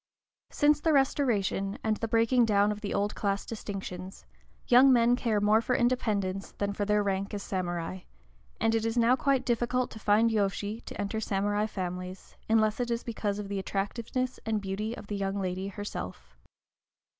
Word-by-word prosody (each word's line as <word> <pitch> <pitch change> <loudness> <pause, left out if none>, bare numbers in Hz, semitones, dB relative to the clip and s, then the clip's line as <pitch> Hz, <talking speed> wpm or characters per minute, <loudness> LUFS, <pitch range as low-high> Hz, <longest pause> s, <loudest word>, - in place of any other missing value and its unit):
Since 295 0 +3
the 320 - +2
Restoration, 230 -8 +1
and 220 -1 +1
the 225 - -2
breaking 230 +2 +3
down 205 -1 +3
of 210 0 -5
the 205 - -4
old 205 +1 0
class 200 -1 -1
distinctions, 195 -4 -7 0.4
young 260 +3 +7
men 240 -1 +5
care 230 -4 0
more 210 +2 +4
for 245 +2 0
independence 210 -6 0
than 200 0 -2
for 205 0 -2
their 210 0 +2
rank 195 +1 -2
as 200 - -5
samurai; 175 -1 -3 0.6
and 225 0 +2
it 225 -1 +1
is 225 +1 -1
now 235 +2 +5
quite 270 -1 +1
difficult 245 +1 0
to 220 - -9
find 215 +2 +3
yōshi 205 +1 -1
to - - -8
enter 205 +2 -2
samurai 205 0 0
families, 180 -2 -6
unless 220 0 +3
it 245 -1 -1
be 235 - +2
because 210 -3 -2
of 210 -1 -5
the 200 0 -3
attractiveness 235 +6 -3
and 220 -1 0
beauty 210 +4 -3
of - - -9
the 205 0 -4
young 195 0 -2
lady 185 0 -2
herself. 90 - -7
210 Hz, 180 wpm, -29 LUFS, 195-230 Hz, 0.6 s, young